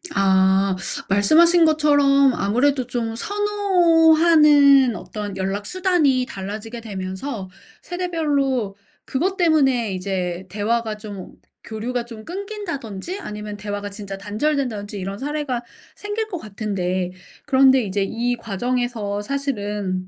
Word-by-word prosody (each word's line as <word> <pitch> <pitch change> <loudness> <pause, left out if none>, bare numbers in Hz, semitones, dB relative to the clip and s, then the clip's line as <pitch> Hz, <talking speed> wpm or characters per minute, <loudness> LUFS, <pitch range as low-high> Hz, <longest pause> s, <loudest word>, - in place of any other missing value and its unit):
아. 190 0 +3 0.3
말씀하신 325 - +5
것처럼 285 -3 +4
아무래도 255 +6 +1
좀 230 -2 -3
선호하는 325 - +4
어떤 205 -2 -6
연락 195 +2 -2
수단이 335 - +2
달라지게 215 +4 -6
되면서 195 +1 -5 0.3
세대별로 290 - -1 0.3
그것 370 +8 -1
때문에 270 - +2
이제 185 -1 -3
대화가 215 +3 -1
좀 205 -3 -9 0.3
교류가 235 +2 -4
좀 230 -2 -10
끊긴다든지 360 - -6
아니면 210 - -7
대화가 205 0 -5
진짜 200 -1 -7
단절된다든지 215 -1 -2
이런 195 +1 -5
사례가 280 -2 -3 0.3
생길 415 +2 -4
것 385 -5 -5
같은데 190 - -3 0.3
그런데 265 -2 +5
이제 200 -1 -1
이 235 +4 -1
과정에서 230 -1 -2
사실은 205 -7 -3
235 Hz, 280 characters per minute, -21 LUFS, 200-295 Hz, 0.3 s, 말씀하신